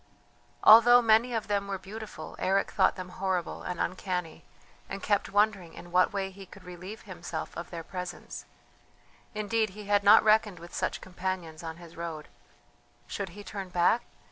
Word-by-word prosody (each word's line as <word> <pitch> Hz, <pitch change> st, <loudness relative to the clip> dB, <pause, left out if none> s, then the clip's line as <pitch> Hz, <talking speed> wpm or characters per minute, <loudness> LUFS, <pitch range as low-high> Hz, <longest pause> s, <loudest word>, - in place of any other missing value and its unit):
Although 240 Hz, +2 st, +9 dB
many 225 Hz, +2 st, +4 dB
of 220 Hz, -, -2 dB
them 200 Hz, -1 st, 0 dB
were 195 Hz, -1 st, -2 dB
beautiful, 210 Hz, +3 st, -9 dB
Eric 195 Hz, +1 st, +1 dB
thought -, -, +3 dB
them 185 Hz, -1 st, -7 dB
horrible 185 Hz, -2 st, -2 dB
and 180 Hz, -1 st, -5 dB
uncanny, 180 Hz, -2 st, -3 dB, 0.5 s
and 195 Hz, -, -6 dB
kept 205 Hz, -2 st, +1 dB
wondering 200 Hz, -4 st, +1 dB
in 175 Hz, -, -11 dB
what 180 Hz, +3 st, +4 dB
way 195 Hz, -1 st, -2 dB
he 195 Hz, 0 st, -12 dB
could 195 Hz, 0 st, -14 dB
relieve 180 Hz, +4 st, -9 dB
himself 180 Hz, -4 st, -6 dB
of 170 Hz, -, -6 dB
their 170 Hz, -1 st, -6 dB
presence; 180 Hz, +1 st, -7 dB, 0.9 s
indeed 215 Hz, +1 st, 0 dB
he 210 Hz, -, -8 dB
had 205 Hz, 0 st, +2 dB
not 205 Hz, +2 st, +8 dB
reckoned 215 Hz, -3 st, +3 dB
with 170 Hz, +1 st, -12 dB
such -, -, -2 dB
companions 180 Hz, -3 st, -5 dB
on 165 Hz, -1 st, -6 dB
his 170 Hz, -1 st, -13 dB
road. 165 Hz, -2 st, -6 dB, 0.8 s
Should 200 Hz, -2 st, -5 dB
he 205 Hz, -, -8 dB
turn 195 Hz, -2 st, -6 dB
back? 180 Hz, +6 st, +3 dB
190 Hz, 170 wpm, -29 LUFS, 175-210 Hz, 0.9 s, Although